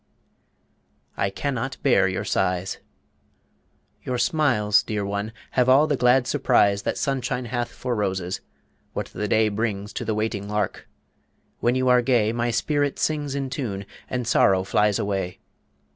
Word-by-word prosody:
I 100 Hz, -, 0 dB
CAN 140 Hz, +8 st, -3 dB
NOT 130 Hz, +2 st, -3 dB
BEAR -, -, +4 dB
YOUR -, -, -2 dB
SIGHS 90 Hz, 0 st, -1 dB, 1.2 s
Your 125 Hz, -, -3 dB
smiles, 120 Hz, -6 st, +3 dB
dear 105 Hz, -2 st, -3 dB
one, 100 Hz, +2 st, -3 dB, 0.2 s
have 125 Hz, 0 st, +2 dB
all 135 Hz, +4 st, +6 dB
the 150 Hz, -2 st, +1 dB
glad 125 Hz, 0 st, +4 dB
surprise 100 Hz, -7 st, +3 dB
The -, -, -2 dB
sunshine 130 Hz, -2 st, -2 dB
hath 120 Hz, 0 st, -2 dB
for 125 Hz, +1 st, -4 dB
roses; 95 Hz, -4 st, -2 dB, 0.5 s
what -, -, -4 dB
the 105 Hz, -, -2 dB
day 110 Hz, +1 st, +3 dB
Brings 105 Hz, -1 st, -3 dB
to -, -, -4 dB
the 110 Hz, -1 st, -1 dB
waiting 105 Hz, -2 st, -2 dB
lark. 105 Hz, -2 st, -2 dB, 0.7 s
When 120 Hz, +1 st, +2 dB
you 130 Hz, 0 st, +1 dB
are 125 Hz, 0 st, +5 dB
gay 120 Hz, -3 st, +2 dB
My 120 Hz, 0 st, 0 dB
spirit 145 Hz, +4 st, 0 dB
sings 145 Hz, -3 st, -1 dB
in 135 Hz, -2 st, -3 dB
tune, 100 Hz, -9 st, -4 dB, 0.2 s
and 125 Hz, -2 st, -2 dB
sorrow 95 Hz, -4 st, +4 dB
flies 105 Hz, +1 st, +2 dB
Away. 95 Hz, -3 st, -2 dB
115 Hz, 155 wpm, -24 LUFS, 100-130 Hz, 1.2 s, all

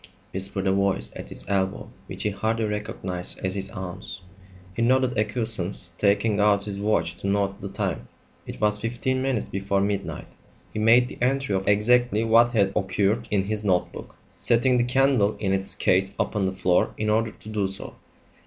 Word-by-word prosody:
"It's -, -, -18 dB
beginning," -, -, -33 dB
whispered 95 Hz, +1 st, -2 dB
a 95 Hz, -, +3 dB, 0.2 s
voice -, -, -1 dB
at -, -, -8 dB
his -, -, -6 dB
elbow 95 Hz, -1 st, -1 dB, 0.2 s
which -, -, -4 dB
he 105 Hz, -, 0 dB
hardly 110 Hz, +3 st, -1 dB
recognised 95 Hz, -4 st, -4 dB
as 95 Hz, -, 0 dB
his 95 Hz, 0 st, -2 dB
aunt's. 95 Hz, 0 st, -7 dB, 0.5 s
He -, -, -2 dB
nodded 130 Hz, +1 st, +2 dB
acquiescence, 105 Hz, -5 st, +2 dB
taking 100 Hz, +1 st, +2 dB
out 105 Hz, -1 st, +3 dB
his 100 Hz, -1 st, -5 dB
watch 100 Hz, -5 st, 0 dB
to -, -, -5 dB
note 100 Hz, 0 st, -1 dB
the -, -, -5 dB
time. -, -, -3 dB, 0.4 s
It -, -, -7 dB
was 105 Hz, 0 st, +1 dB
fifteen 120 Hz, +3 st, -2 dB
minutes 130 Hz, -5 st, -1 dB
before 100 Hz, 0 st, -1 dB
midnight; 100 Hz, -1 st, -2 dB, 0.5 s
he -, -, -3 dB
made 115 Hz, +3 st, +5 dB
the -, -, -11 dB
entry 135 Hz, -2 st, 0 dB
of 95 Hz, 0 st, -1 dB
exactly 110 Hz, +2 st, +3 dB
what 115 Hz, +1 st, +5 dB
had 100 Hz, -3 st, +2 dB
occurred 100 Hz, +4 st, 0 dB
in 100 Hz, -2 st, +1 dB
his 105 Hz, +1 st, -3 dB
notebook, 95 Hz, -3 st, -2 dB, 0.2 s
setting 125 Hz, +1 st, +2 dB
the -, -, +3 dB
candle 125 Hz, -5 st, +2 dB
in 95 Hz, -2 st, -1 dB
its 95 Hz, 0 st, 0 dB
case 95 Hz, +2 st, +1 dB
upon 100 Hz, -2 st, 0 dB
the 95 Hz, -, -4 dB
floor 90 Hz, -1 st, +1 dB
in 105 Hz, 0 st, 0 dB
order 110 Hz, +1 st, +1 dB
to 110 Hz, -, -13 dB
do 105 Hz, -3 st, -1 dB
so. 95 Hz, +1 st, -7 dB
105 Hz, 190 wpm, -24 LUFS, 95-115 Hz, 0.5 s, made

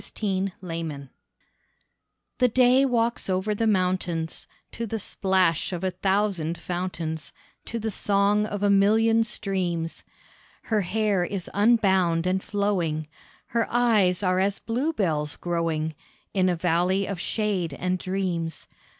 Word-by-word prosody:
THE -, -, -9 dB, 0.4 s
DAY 175 Hz, -3 st, -6 dB, 1.6 s
The 250 Hz, -, +5 dB
day 255 Hz, +3 st, +4 dB
walks 235 Hz, -4 st, 0 dB
over 190 Hz, +3 st, 0 dB
the 225 Hz, +2 st, 0 dB
mountains, 180 Hz, -4 st, -1 dB, 0.2 s
To 230 Hz, -, -4 dB
the 225 Hz, -, -2 dB
splash 190 Hz, -5 st, +1 dB
of 180 Hz, 0 st, -4 dB
a 185 Hz, -, +1 dB
thousand 190 Hz, -3 st, 0 dB
fountains, 170 Hz, -3 st, -4 dB, 0.3 s
To 235 Hz, -, -4 dB
the 220 Hz, -1 st, -2 dB
song 205 Hz, +1 st, +2 dB
of 205 Hz, -1 st, -4 dB
a 205 Hz, -, +4 dB
million 220 Hz, +3 st, +4 dB
streams. 180 Hz, -6 st, -2 dB, 0.6 s
Her 215 Hz, -2 st, +1 dB
hair 200 Hz, 0 st, +1 dB
is 185 Hz, 0 st, -4 dB
unbound 190 Hz, -6 st, +3 dB
and 185 Hz, +1 st, +1 dB
flowing, 175 Hz, -8 st, -1 dB, 0.4 s
Her 230 Hz, 0 st, 0 dB
eyes 215 Hz, -6 st, +3 dB
are 185 Hz, 0 st, +2 dB
as 200 Hz, +1 st, +1 dB
bluebells 210 Hz, -, -1 dB
growing 165 Hz, -2 st, -1 dB, 0.4 s
In 185 Hz, -2 st, +3 dB
a 180 Hz, -, +1 dB
valley 180 Hz, +3 st, +1 dB
of 195 Hz, -3 st, -4 dB
shade 185 Hz, -7 st, -1 dB
and 180 Hz, +3 st, -1 dB
dreams. 180 Hz, -4 st, -2 dB
190 Hz, 130 wpm, -25 LUFS, 175-210 Hz, 1.6 s, The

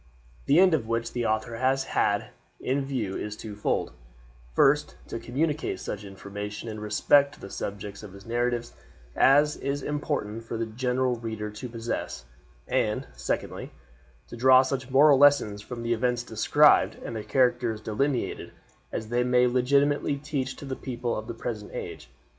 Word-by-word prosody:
The 150 Hz, -, +5 dB
end 185 Hz, -2 st, +6 dB
which 115 Hz, 0 st, -2 dB
the 120 Hz, -1 st, -1 dB
author 110 Hz, +2 st, -1 dB
has 130 Hz, +2 st, +2 dB
had 100 Hz, -5 st, 0 dB, 0.3 s
in 135 Hz, +2 st, 0 dB
view 115 Hz, -8 st, -2 dB
is 105 Hz, 0 st, -5 dB
twofold: 105 Hz, -2 st, -2 dB, 0.6 s
first, 145 Hz, +2 st, +3 dB
to 115 Hz, -, -4 dB
communicate 150 Hz, +6 st, -1 dB
such 105 Hz, 0 st, -5 dB
information 105 Hz, +2 st, -7 dB
in 110 Hz, -1 st, -5 dB
respect 140 Hz, +7 st, +3 dB
to -, -, -21 dB
the 100 Hz, -, -9 dB
subjects 100 Hz, 0 st, -6 dB
of 105 Hz, -3 st, -10 dB
his 100 Hz, 0 st, -13 dB
narratives 120 Hz, 0 st, -1 dB, 0.4 s
as 145 Hz, +2 st, +5 dB
is 140 Hz, 0 st, -3 dB
important 145 Hz, -7 st, -3 dB
for 115 Hz, 0 st, -5 dB
the 115 Hz, -, -1 dB
general 125 Hz, +2 st, 0 dB
reader 110 Hz, -2 st, -5 dB
to 110 Hz, +4 st, -7 dB
possess; 115 Hz, -, -4 dB, 0.4 s
and, -, -, 0 dB
secondly, -, -, -4 dB, 0.6 s
to -, -, -8 dB
draw 130 Hz, +2 st, +6 dB
such 130 Hz, -1 st, -3 dB
moral 140 Hz, +1 st, +6 dB
lessons 140 Hz, -8 st, +4 dB
from 120 Hz, +2 st, -7 dB
the 115 Hz, 0 st, +1 dB
events 120 Hz, +1 st, 0 dB
described -, -, +4 dB
and -, -, -5 dB
the 110 Hz, -, -4 dB
characters 120 Hz, -4 st, +1 dB
delineated 125 Hz, +5 st, -2 dB, 0.4 s
as 110 Hz, -, -4 dB
they 120 Hz, +1 st, +1 dB
may 125 Hz, 0 st, +4 dB
legitimately 140 Hz, +4 st, +2 dB
teach 140 Hz, -3 st, -3 dB
to -, -, -9 dB
the 135 Hz, -1 st, -4 dB
people 120 Hz, -2 st, -3 dB
of 110 Hz, -, -5 dB
the 115 Hz, -, -5 dB
present 110 Hz, -3 st, -5 dB
age. -, -, -7 dB
120 Hz, 160 wpm, -27 LUFS, 110-135 Hz, 0.6 s, end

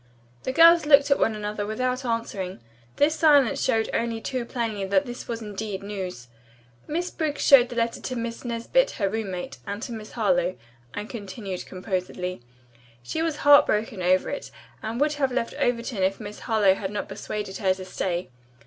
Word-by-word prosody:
The -, -, 0 dB
girls 330 Hz, +2 st, +7 dB
looked 280 Hz, -1 st, +6 dB
at 280 Hz, -, +4 dB
one 220 Hz, -, +2 dB
another 210 Hz, 0 st, -3 dB
without 255 Hz, +5 st, -1 dB
answering. 210 Hz, -, -3 dB, 0.4 s
This 300 Hz, +2 st, +3 dB
silence 290 Hz, -6 st, +4 dB
showed 225 Hz, 0 st, +2 dB
only 230 Hz, -1 st, -1 dB
too 245 Hz, +1 st, -3 dB
plainly 230 Hz, -5 st, -3 dB
that 200 Hz, +10 st, +2 dB
this 245 Hz, -1 st, -7 dB
was 230 Hz, -1 st, -4 dB
indeed 205 Hz, -1 st, -5 dB
news. 185 Hz, -11 st, -6 dB, 0.6 s
"Miss 345 Hz, +4 st, -2 dB
Briggs 305 Hz, -3 st, -2 dB
showed 255 Hz, -3 st, +7 dB
the 245 Hz, -, -7 dB
letter 230 Hz, 0 st, -1 dB
to 255 Hz, -, -4 dB
Miss 230 Hz, -1 st, -4 dB
Nesbit, 245 Hz, -, +1 dB
her 200 Hz, -, +1 dB
roommate, 190 Hz, -, -4 dB
and 200 Hz, +1 st, -3 dB
to -, -, -5 dB
Miss 220 Hz, -2 st, -8 dB
Harlowe," 240 Hz, -3 st, +1 dB, 0.4 s
Anne 210 Hz, +1 st, -4 dB
continued 200 Hz, -4 st, -6 dB
composedly. 185 Hz, -, -4 dB, 0.6 s
"She 220 Hz, -, -3 dB
was 325 Hz, -2 st, 0 dB
heartbroken 225 Hz, -8 st, +5 dB
over 185 Hz, +1 st, +2 dB
it 285 Hz, -, -5 dB, 0.3 s
and 225 Hz, +2 st, -4 dB
would 295 Hz, +1 st, +2 dB
have 275 Hz, -3 st, 0 dB
left 245 Hz, -2 st, -1 dB
Overton 235 Hz, -3 st, 0 dB
if 190 Hz, +1 st, +1 dB
Miss 210 Hz, -1 st, -8 dB
Harlowe 215 Hz, -4 st, +3 dB
had 190 Hz, 0 st, -4 dB
not 205 Hz, +1 st, -4 dB
persuaded 205 Hz, -2 st, -5 dB
her 190 Hz, -3 st, +2 dB
to 185 Hz, 0 st, -8 dB
stay. 180 Hz, -3 st, -3 dB
225 Hz, 175 wpm, -25 LUFS, 195-255 Hz, 0.6 s, girls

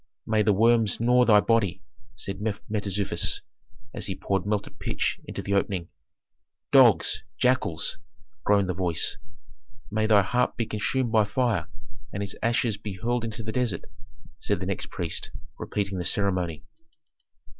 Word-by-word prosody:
"May 110 Hz, -1 st, +2 dB
the 105 Hz, 0 st, +3 dB
worms 115 Hz, +1 st, +3 dB
gnaw 125 Hz, +2 st, +4 dB
thy 105 Hz, -3 st, +6 dB
body," 100 Hz, -5 st, +1 dB, 0.3 s
said 100 Hz, -2 st, -4 dB
Mentezufis, 105 Hz, -2 st, -1 dB, 0.5 s
as -, -, -4 dB
he 95 Hz, -, -3 dB
poured 95 Hz, +1 st, -1 dB
melted 105 Hz, -1 st, -2 dB
pitch -, -, -1 dB
into -, -, -6 dB
the 100 Hz, -, -2 dB
opening. 95 Hz, -3 st, 0 dB, 0.8 s
"Dogs 120 Hz, -10 st, +5 dB, 0.2 s
jackals!" 125 Hz, -9 st, +1 dB, 0.4 s
groaned 100 Hz, -2 st, +3 dB
the 90 Hz, -, 0 dB
voice. 90 Hz, -3 st, -1 dB, 0.7 s
"May 110 Hz, +1 st, +1 dB
thy 105 Hz, -2 st, +6 dB
heart 125 Hz, +6 st, 0 dB
be 115 Hz, -, 0 dB
consumed 115 Hz, +3 st, -1 dB
by 110 Hz, -2 st, +4 dB
fire 105 Hz, -5 st, 0 dB, 0.4 s
and 100 Hz, -, -3 dB
its 100 Hz, -, -5 dB
ashes 115 Hz, -2 st, +1 dB
be 105 Hz, -1 st, -6 dB
hurled 120 Hz, +4 st, -1 dB
into 115 Hz, 0 st, -5 dB
the 110 Hz, -, -3 dB
desert," 120 Hz, -7 st, -1 dB, 0.6 s
said -, -, -1 dB
the -, -, -4 dB
next -, -, -3 dB
priest, 85 Hz, -2 st, -3 dB, 0.3 s
repeating 100 Hz, -2 st, -2 dB
the -, -, -2 dB
ceremony. 90 Hz, -6 st, -1 dB
105 Hz, 145 wpm, -26 LUFS, 95-115 Hz, 0.8 s, thy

